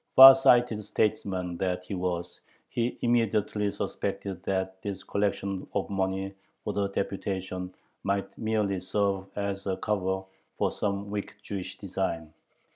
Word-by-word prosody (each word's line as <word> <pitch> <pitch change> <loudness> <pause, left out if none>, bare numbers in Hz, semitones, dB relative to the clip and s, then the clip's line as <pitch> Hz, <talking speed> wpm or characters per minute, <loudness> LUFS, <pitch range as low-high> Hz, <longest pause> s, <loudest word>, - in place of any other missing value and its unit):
Far 135 +1 +13
sighted 120 -4 +4
statesman 95 -4 0
that 90 -1 -1
he 100 - -5
was, 90 -2 -3 0.3
he 120 +1 -1
immediately 105 -3 +2
suspected 95 -2 -3
"that 95 0 -1
this 100 -2 -4
collection 100 -1 -1
[of 100 0 -1
money 95 0 -1 0.3
for - - -2
the 100 -1 +1
deputation] 95 -2 -3 0.3
might 100 0 -1
merely 105 -3 0
serve 95 +1 0
as 100 -1 -2
a 95 - 0
cover 95 -2 0 0.3
for - - +2
some 100 0 -2
wicked 105 -1 -4
Jewish 95 -3 -5
design." 85 -5 -3
100 Hz, 130 wpm, -28 LUFS, 95-105 Hz, 0.3 s, Far